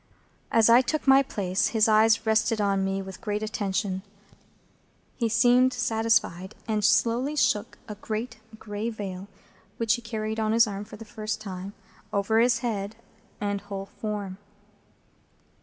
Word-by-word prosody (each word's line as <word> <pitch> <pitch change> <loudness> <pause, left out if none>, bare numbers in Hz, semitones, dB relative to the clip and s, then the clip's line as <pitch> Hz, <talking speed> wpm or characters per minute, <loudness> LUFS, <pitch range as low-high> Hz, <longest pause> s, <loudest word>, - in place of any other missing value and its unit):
As 225 -1 +5
I 235 +2 +7
took 305 +4 -2
my 270 0 +7
place, 195 -7 -1
his 215 - +5
eyes 220 +1 +4
rested 220 0 +2
on 200 -2 +1
me 195 0 -1
with 190 0 -10
great 210 0 -2
attention; 200 -2 -2 1.2
he 230 -3 0
seemed 245 +3 +4
satisfied, 225 -6 0
and 215 -2 0
slowly 230 +7 +2
shook 215 -6 +1
a 215 - -5
great 215 +2 -5 0.2
gray 210 +1 -4
veil, 195 -4 -6 0.5
which 230 -1 +2
he 240 - -2
carried 220 -1 -4
on 215 0 +1
his 230 0 +6
arm 205 -1 -5
for 215 - -11
the 225 - -10
first 215 0 -4
time, 195 -1 -7 0.4
over 205 +3 +1
his 235 0 +3
head 205 -2 -3 0.4
and 205 -1 -2
whole 200 -1 -6
form. 205 -3 -4
215 Hz, 150 wpm, -26 LUFS, 200-230 Hz, 1.2 s, I